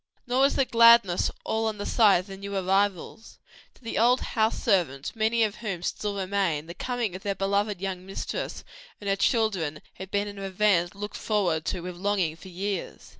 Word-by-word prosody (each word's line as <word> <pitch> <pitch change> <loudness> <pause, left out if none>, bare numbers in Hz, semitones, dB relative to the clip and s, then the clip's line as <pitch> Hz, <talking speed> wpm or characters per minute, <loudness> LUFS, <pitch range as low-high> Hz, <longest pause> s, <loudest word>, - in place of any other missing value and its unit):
Nor 250 +2 +1
was 275 +1 +4
the 270 - +3
gladness 230 -7 +5 0.2
all 225 0 0
on 215 -1 -3
the 205 - -5
side 205 -6 +4
of - - -16
the 195 -1 -9
new 200 +1 -5
arrivals: 195 +3 -1 0.4
to - - -24
the 225 - -2
old 245 +3 +4
house 220 -1 +2
servants, 170 - 0
many 225 +1 +2
of 210 -2 -1
whom 195 -7 -5
still 205 +2 -3
remained, 185 -6 -1
the 170 - -7
coming 240 -3 -3
of 185 - -7
their 200 0 -2
beloved 200 0 0
young 190 -1 -4
mistress 195 - -5 0.4
and 205 - -8
her 195 - +2
children 195 - 0
had 190 0 -9
been 205 +1 0
an 205 -1 -8
event 195 -2 +1
looked 205 +1 -6
forward 180 -7 0
to 180 - -2
with 180 0 -7
longing 190 -4 0
for 180 - -13
years. 190 +1 -5
200 Hz, 195 wpm, -26 LUFS, 185-220 Hz, 0.4 s, gladness